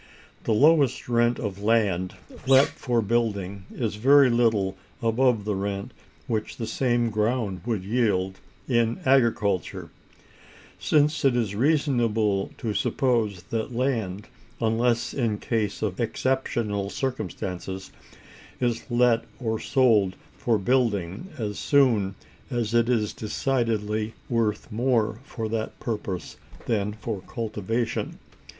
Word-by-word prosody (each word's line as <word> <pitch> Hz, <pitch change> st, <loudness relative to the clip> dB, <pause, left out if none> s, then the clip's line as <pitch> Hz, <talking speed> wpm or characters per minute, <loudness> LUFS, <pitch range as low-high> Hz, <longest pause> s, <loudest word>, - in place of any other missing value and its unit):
The -, -, +1 dB
lowest 140 Hz, +1 st, +4 dB
rent 120 Hz, 0 st, +2 dB
of 100 Hz, -3 st, -4 dB
land 100 Hz, -5 st, +1 dB, 0.3 s
let 135 Hz, +1 st, +6 dB
for 120 Hz, -3 st, -1 dB
building 100 Hz, -4 st, -1 dB
is 110 Hz, -4 st, -3 dB
very 135 Hz, +3 st, +6 dB
little 110 Hz, -5 st, +2 dB, 0.2 s
above 115 Hz, -1 st, +2 dB
the 105 Hz, -, 0 dB
rent 100 Hz, +4 st, -3 dB, 0.3 s
which 110 Hz, -4 st, -3 dB
the 115 Hz, -, -3 dB
same 120 Hz, 0 st, +1 dB
ground 105 Hz, -3 st, 0 dB
would 110 Hz, -6 st, -1 dB
yield 95 Hz, -4 st, 0 dB, 0.3 s
in 120 Hz, -2 st, +1 dB
agriculture: 115 Hz, -8 st, +1 dB, 0.9 s
since 150 Hz, +1 st, +2 dB
it 135 Hz, -3 st, +4 dB
is 115 Hz, -5 st, 0 dB
reasonable 115 Hz, -6 st, +1 dB
to 110 Hz, -3 st, -3 dB
suppose 110 Hz, -8 st, 0 dB
that 115 Hz, +1 st, -2 dB
land, 110 Hz, -6 st, -1 dB, 0.3 s
unless 115 Hz, +1 st, +1 dB
in 115 Hz, -6 st, 0 dB
case 105 Hz, -2 st, -2 dB
of 100 Hz, -4 st, -2 dB
exceptional 115 Hz, -5 st, -1 dB
circumstances, 95 Hz, -6 st, -4 dB, 0.7 s
is 120 Hz, -1 st, -1 dB
let 120 Hz, -1 st, +3 dB, 0.2 s
or 110 Hz, -3 st, -1 dB
sold 110 Hz, -8 st, +3 dB, 0.2 s
for 115 Hz, -2 st, +1 dB
building 105 Hz, -, 0 dB
as 105 Hz, -3 st, -3 dB
soon 115 Hz, -9 st, +3 dB, 0.3 s
as 120 Hz, -2 st, -2 dB
it 115 Hz, 0 st, +3 dB
is 110 Hz, -4 st, +1 dB
decidedly 110 Hz, -2 st, -1 dB
worth 115 Hz, -2 st, 0 dB
more 115 Hz, -1 st, +1 dB
for 115 Hz, -5 st, -4 dB
that 110 Hz, 0 st, -3 dB
purpose 105 Hz, -6 st, -4 dB, 0.3 s
than 105 Hz, -3 st, 0 dB
for 105 Hz, -1 st, -5 dB
cultivation. 115 Hz, +1 st, -2 dB
115 Hz, 120 wpm, -25 LUFS, 105-120 Hz, 0.9 s, let